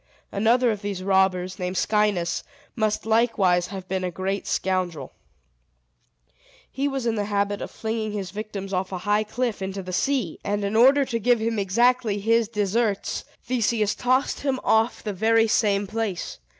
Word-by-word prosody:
Another 230 +4 +3
of 210 -2 -4
these 200 -3 -4
robbers, 190 -1 +1
named 180 0 -3
Scinis, 210 -5 +1 0.3
must 215 -3 0
likewise 210 -6 +2
have 190 -2 -8
been 190 0 -2
a 180 - -1
very - - -9
great 190 +3 -3
scoundrel. 180 -7 -2 1.6
He 275 +2 -1
was 270 -3 -3
in 230 - +1
the 205 -2 -1
habit 205 0 -1
of - - -5
flinging 220 -1 -3
his 195 -4 -4
victims 200 -2 -6
off 185 +1 -1
a 185 - -3
high 205 +3 +1
cliff 225 0 -3
into 190 0 -4
the 185 0 -7
sea; 250 - 0
and, 205 0 -1
in 200 +2 -2
order 270 +5 +6
to 235 -3 -2
give 240 +1 +3
him 225 0 -1
exactly 230 +2 +2
his 225 +2 +2
deserts, 210 0 -1 0.2
Theseus 230 -4 +1
tossed 255 +2 +1
him 270 -2 -1
off 220 +2 +2
the 210 - -3
very 225 +3 +3
same 205 -2 +2
place. 210 -3 -4
210 Hz, 170 wpm, -24 LUFS, 190-230 Hz, 1.6 s, order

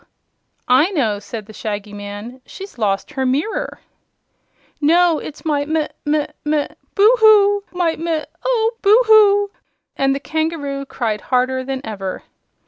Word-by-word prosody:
"I 260 +8 +4
know," 235 - 0
said 215 0 -8
the 215 - -13
Shaggy 210 -1 -5
Man; 205 +5 -8
"she's 390 -2 -11
lost 200 +3 -1
her 270 -3 -2
mirror." 300 - -2 1.0
"No; 335 +2 +4
it's 310 - -10
my 295 -2 +1
mi 310 0 -1 0.2
mi 295 0 +1 0.2
mi 300 -1 +1 0.3
Boo 430 +4 +6
hoo! 410 -2 +5
My 350 -3 0
mi 325 -1 -2 0.2
Oh, 460 -3 +1
Boo 420 +4 +6
hoo!" 410 -2 +5 0.4
and 270 0 +1
the - - -3
kangaroo 295 -3 -3
cried 220 -5 -2
harder 260 0 0
than 265 0 -4
ever. 195 -4 -5
295 Hz, 140 wpm, -19 LUFS, 250-365 Hz, 1.0 s, Boo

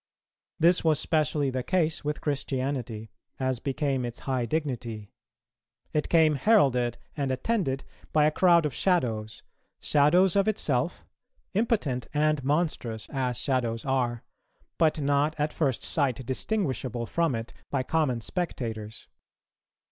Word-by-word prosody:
This 170 +2 +4
was 155 -3 +3
specially 150 -3 +1
the 130 0 -2
case 165 +1 0
with 150 0 -3
Christianity, 130 -6 -3 0.3
as 130 -2 0
became 135 -1 -1
its 120 -1 -5
high 130 -3 -1
dignity; 120 -9 -3 0.8
it 150 -1 0
came 160 -2 +5
heralded 135 - +3 0.2
and 140 -2 -1
attended 135 - -1 0.3
by 150 -1 +4
a 155 - +4
crowd 170 -1 +4
of 145 - -1
shadows, 110 - 0 0.4
shadows 170 +6 +4
of 200 +1 +3
itself, 215 -1 0 0.5
impotent 185 - 0
and 150 -2 +2
monstrous 140 -7 -1
as 125 -3 -1
shadows 120 -4 -1
are, 125 -3 0 0.6
but 160 -1 +3
not 145 +2 +1
at 150 +1 0
first 135 -6 0
sight 130 -4 0
distinguishable 130 - -2
from 165 +2 0
it 115 +1 -6 0.2
by 135 -2 0
common 130 -5 0
spectators. 110 - -4
140 Hz, 125 wpm, -27 LUFS, 125-160 Hz, 0.8 s, came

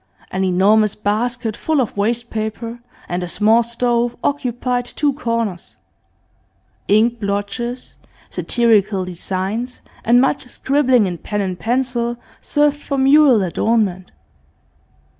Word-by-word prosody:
An 190 - -1
enormous 200 +3 +3
basket 225 +2 -1
full 315 -2 0
of 250 - -1
waste 235 +4 -1
paper, 225 +2 -4 0.3
and 175 +1 -2
a 180 - -3
small 220 +6 +3
stove, 235 0 0
occupied 250 -3 -1
two 285 +3 -1
corners; 230 - -3 1.1
ink 230 +3 +3
blotches, 205 +5 -4 0.3
satirical 215 -5 +2
designs, 190 +7 -4 0.2
and 240 +2 +5
much 265 0 +1
scribbling 260 -3 +2
in 175 -3 -4
pen 210 -1 -3
and 185 -2 -3
pencil 240 0 -1 0.2
served 295 0 +1
for 280 - -3
mural 270 -4 +5
adornment. 185 -1 0
230 Hz, 115 wpm, -19 LUFS, 205-245 Hz, 1.1 s, and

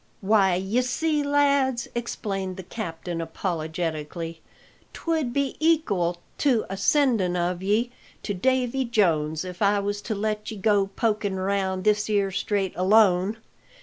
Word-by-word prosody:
"Why, 195 -2 +3
y'see, 250 - 0
lads," 280 -3 +2
explained 195 -5 -3
the 190 - -6
captain 170 -4 -5
apologetically, 165 -1 -4 0.5
"'twould 320 -7 -1
be 280 +2 -1
ekal 210 - +2 0.2
to 255 -6 +2
a - - -2
sendin' 210 -4 +2
of 175 0 -1
ye 215 +5 +1 0.3
to 205 - -2
Davy 260 +5 +1
Jones 165 -9 +1
if 180 +1 -8
I 205 0 +4
was 205 0 -2
to 215 - -3
let 210 +1 -2
ye 220 - -6
go 200 -1 +2
pokin" 210 -1 -1
round 190 -1 -1
this 210 0 +2
'ere 200 -2 +1
Strait 200 0 -1
alone. 195 +1 +4
200 Hz, 135 wpm, -25 LUFS, 185-235 Hz, 0.5 s, I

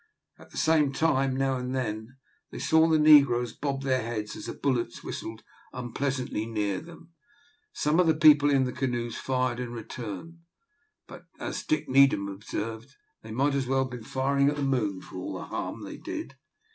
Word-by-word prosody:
At - - -15
the - - -11
same 155 -3 +3
time, 135 -4 +1
now 135 -1 +1
and 125 +1 -3
then, 115 0 -4 0.3
they - - -8
saw 160 0 +4
the 160 -1 +4
negroes 140 -6 +6
bob 135 -1 -3
their 130 -1 +1
heads 110 -2 -4
as - - -8
the - - -4
bullets 120 -4 -1
whistled 110 0 -6 0.3
unpleasantly 125 -2 -3
near 105 -3 -1
them. 165 0 -14 0.6
Some 150 +3 +1
of 180 - +4
the 160 - +4
people 150 -2 +6
in 135 -2 +4
the 125 - -2
canoes 120 -3 -2
fired 130 -2 -1
in 125 -2 -4
return, 120 - -7 0.7
but, - - -12
as - - -4
Dick 310 - -1
Needham 135 -7 +4
observed, 110 +5 -6 0.3
they 110 - -12
might 135 +6 +1
as 135 -2 -1
well 135 0 +2
have 130 - -6
been 125 -2 -7
firing 140 +3 +1
at 145 - -1
the 145 - -2
moon 110 -9 0
for - - -10
all 90 - -5
the - - -7
harm - - -5
they - - -7
did. - - -6
130 Hz, 185 wpm, -28 LUFS, 115-140 Hz, 0.7 s, negroes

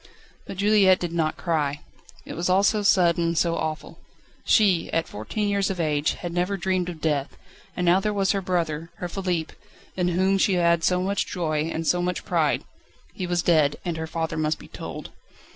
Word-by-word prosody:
But - - -7
Juliette 200 -2 +4
did 175 -1 -4
not 160 -2 0
cry. 150 -4 -1 0.4
It - - -7
was 175 +2 -2
all 190 +2 +4
so 210 +1 +3
sudden, 175 -4 +3
so 165 0 +1
awful. 155 -1 -4 0.4
She, 195 -6 +3
at 165 0 0
fourteen 205 - -3
years 200 -1 +1
of 190 -2 -3
age, 150 -2 +1
had 175 -1 -6
never 180 +3 0
dreamed 185 -1 -1
of 165 -3 -8
death; 150 -3 -1 0.4
and 180 - 0
now 175 +2 +5
there 210 +2 -1
was 195 -2 +1
her 195 - 0
brother, 165 -3 -2
her 180 - -5
Philippe, 175 -3 -2 0.4
in 180 -1 0
whom 190 +2 +2
she 190 0 +3
had 170 -1 +2
so 180 +1 +2
much 200 +1 -1
joy, 160 -3 -1
so 175 +2 +1
much 180 0 -2
pride - - +1 0.5
he 185 - -4
was 175 -1 0
dead 155 -4 +3
and 175 -2 -2
her 160 0 -4
father 160 0 -3
must 155 0 0
be - - -13
told - - -8
175 Hz, 195 wpm, -24 LUFS, 160-190 Hz, 0.5 s, now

